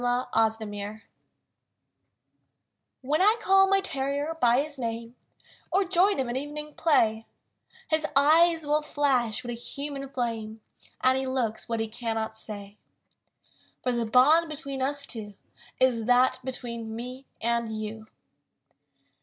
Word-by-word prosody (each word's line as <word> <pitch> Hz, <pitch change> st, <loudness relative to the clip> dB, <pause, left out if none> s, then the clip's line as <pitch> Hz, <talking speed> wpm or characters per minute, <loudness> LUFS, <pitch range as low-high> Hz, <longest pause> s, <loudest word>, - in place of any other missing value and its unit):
THE 245 Hz, -3 st, +1 dB
BOND 205 Hz, +1 st, -6 dB, 2.0 s
When 295 Hz, +6 st, 0 dB
I 420 Hz, +3 st, +6 dB
call 385 Hz, -2 st, +5 dB
my 390 Hz, 0 st, +3 dB
terrier 285 Hz, -1 st, -2 dB
by 245 Hz, +3 st, +4 dB
his 295 Hz, -2 st, -8 dB
name, 230 Hz, 0 st, -4 dB, 0.6 s
Or 390 Hz, +2 st, +3 dB
join 370 Hz, +3 st, +3 dB
him 265 Hz, -2 st, -1 dB
at 240 Hz, -, -3 dB
evening 295 Hz, +2 st, -5 dB
play; 225 Hz, -9 st, +2 dB, 0.6 s
His 315 Hz, -1 st, +1 dB
eyes 320 Hz, +3 st, +5 dB
will 300 Hz, +1 st, +2 dB
flash 265 Hz, -7 st, 0 dB
with 240 Hz, -, -5 dB
a -, -, -3 dB
human 275 Hz, +3 st, -5 dB
flame 225 Hz, -4 st, -4 dB, 0.4 s
And 260 Hz, +1 st, +3 dB
he 265 Hz, -, -3 dB
looks 245 Hz, -5 st, -2 dB
what 230 Hz, -1 st, -1 dB
he 225 Hz, -, -1 dB
cannot 225 Hz, -1 st, -3 dB
say; 205 Hz, -2 st, -8 dB, 1.0 s
For 250 Hz, -, +1 dB
the 235 Hz, -2 st, -1 dB
bond 300 Hz, +8 st, +5 dB
between 280 Hz, -3 st, -5 dB
us 280 Hz, +1 st, 0 dB
two 210 Hz, -4 st, -7 dB, 0.4 s
Is 245 Hz, -4 st, +2 dB
that 250 Hz, +2 st, +4 dB
between 235 Hz, -3 st, -5 dB
me 250 Hz, +3 st, -7 dB
and 235 Hz, 0 st, 0 dB
you! 215 Hz, 0 st, -6 dB
255 Hz, 135 wpm, -27 LUFS, 225-290 Hz, 2.0 s, I